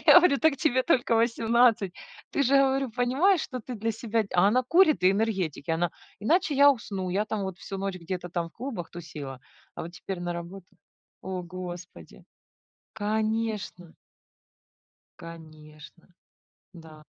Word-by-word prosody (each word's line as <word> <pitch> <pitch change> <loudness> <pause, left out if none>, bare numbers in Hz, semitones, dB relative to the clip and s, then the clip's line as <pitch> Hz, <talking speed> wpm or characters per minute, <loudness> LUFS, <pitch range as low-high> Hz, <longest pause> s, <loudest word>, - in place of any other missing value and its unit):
И - - -16
я - - +10
говорю: 315 -6 +3
"Так 315 -3 +3
тебе 260 -3 +2
только 245 -7 +2
18". 230 -3 +3 0.4
И 280 - +1
говорю: 270 0 +3
"Ты - - -15
же - - -26
понимаешь, 285 +10 +3
что 255 -2 -5
ты 250 +2 -7
для 225 +1 -2
себя" 225 0 -1
А 185 +3 +5
она 255 +4 +3
курит 310 - +4
и 185 - +6
энергетики. 195 -8 -1
Она: 165 +1 +1 0.3
"Иначе 310 - +2
я 285 0 +8
усну. 195 -7 -3
Я 200 +3 0
там 215 -2 -3
вот 190 -2 -5
всю 195 - -7
ночь 195 -1 -3
где-то 175 +1 -5
там 170 -1 -2
в - - -27
клубах 230 -8 -6
тусила, 145 -6 -8 0.3
а - - -6
вот 170 +1 -8
теперь 185 0 -6
на 175 0 -3
работу". 170 +2 -8 0.6
О 185 -1 -4
господи! 180 0 -9 0.7
Конечно! 215 -4 -2 1.3
Конечно. 155 -1 -13 0.6
Да. 160 -4 -14
205 Hz, 155 wpm, -27 LUFS, 175-245 Hz, 1.3 s, я